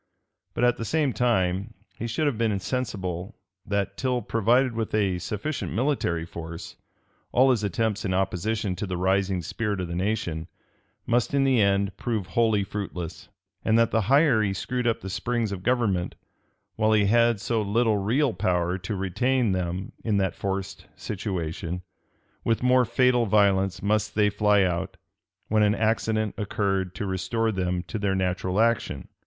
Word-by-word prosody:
But - - 0
at 120 0 +4
the - - -4
same 150 0 +1
time, 100 -3 0 0.2
he 115 - -2
should 120 +7 -1
have 145 -4 +1
been 110 -3 0
sensible 95 -5 -3 0.3
that, 100 -1 -1
till 125 -2 0
provided 120 +4 +2
with 110 -1 -2
a 95 -4 +1
sufficient 110 - -3
military 115 - 0
force, 85 0 -8 0.6
all 130 +2 +5
his 115 -4 +1
attempts 105 +2 -1
in 95 - -1
opposition 95 +2 -1
to 100 - -3
the 90 -1 -3
rising 95 0 +1
spirit 105 +4 -2
of 90 - -3
the 85 - -5
nation, 90 -4 -2 0.6
must 120 +3 +1
in 140 - +3
the 130 -4 +3
end 100 -1 +2
prove 110 -5 -2
wholly 110 -2 +3
fruitless; 90 -4 -6 0.3
and 110 - +3
that 115 0 +3
the 110 - +2
higher 140 -5 +5
he 100 -2 0
screwed 125 +4 -2
up 115 - 0
the - - -7
springs 115 +1 -1
of 95 -2 -4
government, 105 -6 0 0.6
while 110 0 +3
he 105 -2 +4
had 115 +1 +3
so 115 +2 0
little 110 +1 +2
real 120 +6 +1
power 90 -1 0
to 95 +3 -4
retain 120 +5 +1
them 90 0 -2
in 110 -3 +1
that 95 -2 +1
forced 95 -1 -4
situation, 90 -3 -4 0.6
with 115 +1 0
more 125 0 +4
fatal 125 0 +3
violence 95 -3 +2
must 105 +1 0
they 105 -1 +3
fly 105 -1 +3
out, 90 -2 -2 0.5
when 110 0 +2
any 105 0 +3
accident 110 -1 0
occurred 95 -3 -1
to - - -3
restore 110 +4 -1
them 90 -3 -1
to 90 +6 -5
their 100 -2 0
natural 95 +1 -1
action. 115 0 +1
105 Hz, 165 wpm, -26 LUFS, 95-115 Hz, 0.6 s, all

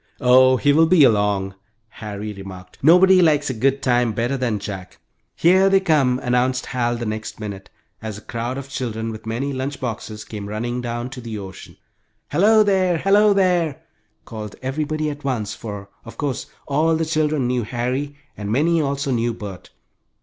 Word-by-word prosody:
"Oh, 130 0 +5
he 145 +2 +3
will 160 +2 +5
be 170 -3 +6
along," 105 -5 +2 0.4
Harry 105 -1 -7
remarked. 95 -2 -11
"Nobody 185 +5 +6
likes 150 -5 +3
a - - -3
good 135 +4 0
time 120 -3 +2
better 120 +5 -1
than 125 -5 -1
Jack." 100 -2 -7 0.4
"Here 190 +3 +4
they 195 0 +5
come!" 145 -8 +2
announced 125 0 +1
Hal, 120 -1 -1
the 120 - -4
next 110 0 -5
minute, 100 -3 -7 0.3
as 110 -2 -6
a - - -11
crowd 120 +3 -4
of 140 0 -6
children 115 -4 -4
with 110 0 -9
many 130 +5 -2
lunch 135 +2 -4
boxes 110 -3 -5
came 100 -1 -7
running 120 +4 -3
down 120 +1 -4
to 130 - -8
the 115 -2 -6
ocean. 95 -2 -10 0.5
"Hello 215 +7 +5
there! 190 -4 +2
Hello 205 +4 +4
there!" 180 -7 +1 0.4
called 105 -2 -7
everybody 155 +3 -2
at 145 0 -10
once, 115 -7 -2
for, 100 -3 -7 0.2
of 115 - -12
course, 140 -4 -3 0.2
all 155 +3 +2
the 160 0 0
children 155 -3 0
knew 125 0 0
Harry 125 +5 -3 0.2
and 105 -1 -6
many 160 +7 +2
also 140 -1 -1
knew 120 -1 0
Bert. 100 -4 -9
125 Hz, 175 wpm, -21 LUFS, 110-150 Hz, 0.5 s, be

